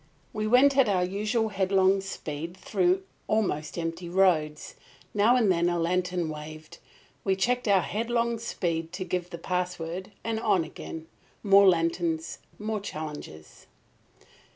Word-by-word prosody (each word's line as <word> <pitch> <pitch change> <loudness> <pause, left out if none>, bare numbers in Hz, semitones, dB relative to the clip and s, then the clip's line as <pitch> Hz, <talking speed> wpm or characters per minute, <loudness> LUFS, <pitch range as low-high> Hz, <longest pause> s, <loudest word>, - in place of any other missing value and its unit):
We 215 0 -2
went 265 +4 +5
at 260 -5 +5
our 185 -2 +2
usual 215 +4 -1
headlong 195 -1 +2
speed 170 -2 -6
through 185 -1 +1 0.2
almost 180 -9 -1
empty 165 +1 -4
roads. 170 -5 +1 0.4
Now 210 +4 +4
and 225 -6 +3
then 170 0 +2
a 175 - 0
lantern 180 0 0
waved. 155 0 -8 0.4
We 195 -1 +2
checked 245 +6 0
our 195 -2 +5
headlong 235 +1 -1
speed 165 -7 -2
to 185 +1 -3
give 180 0 -2
the 170 - -7
password, 180 +1 -3
and 225 -1 -2
on 205 -6 +2
again. 160 0 -8 0.4
More 200 -1 +7
lanterns; 165 -1 0 0.2
more 215 0 -3
challenges. 150 - -8
185 Hz, 135 wpm, -27 LUFS, 165-210 Hz, 0.4 s, More